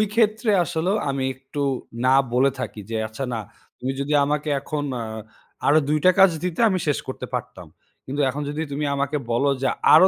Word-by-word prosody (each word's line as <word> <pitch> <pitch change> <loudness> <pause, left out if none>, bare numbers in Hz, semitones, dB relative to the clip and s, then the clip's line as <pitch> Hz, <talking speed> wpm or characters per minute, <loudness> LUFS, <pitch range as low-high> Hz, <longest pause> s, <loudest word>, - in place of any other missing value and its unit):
ক্ষেত্রে 220 0 +3
আসলেও 175 +5 0
আমি 135 -1 -1
একটু 135 +2 -6 0.4
না 130 +1 +5 0.2
বলে 130 +2 +4
থাকি 110 -3 -5
যে, 115 - -3
"আচ্ছা 110 +5 -5
না, 115 - -2 0.4
তুমি 130 +2 -2
যদি 140 +2 -1
আমাকে 150 +1 -1
এখন 145 +1 -3 0.2
আ - - -3 0.6
আরো 155 +2 +6
২ 155 - +2
টা 185 - +8
কাজ 190 -2 +8
দিতে 180 +1 -2
আমি 190 -2 +1
শেষ 145 - +2
করতে - - -5
পারতাম। - - -5 0.4
কিন্তু 140 +3 -2
এখন 140 +3 -3
যদি 150 +2 -3
তুমি 145 +2 -2
আমাকে 140 +2 0
বলো 135 +5 +2
যে 135 - +2 0.3
আরো 175 +5 +9
145 Hz, 190 wpm, -23 LUFS, 135-160 Hz, 0.6 s, আরো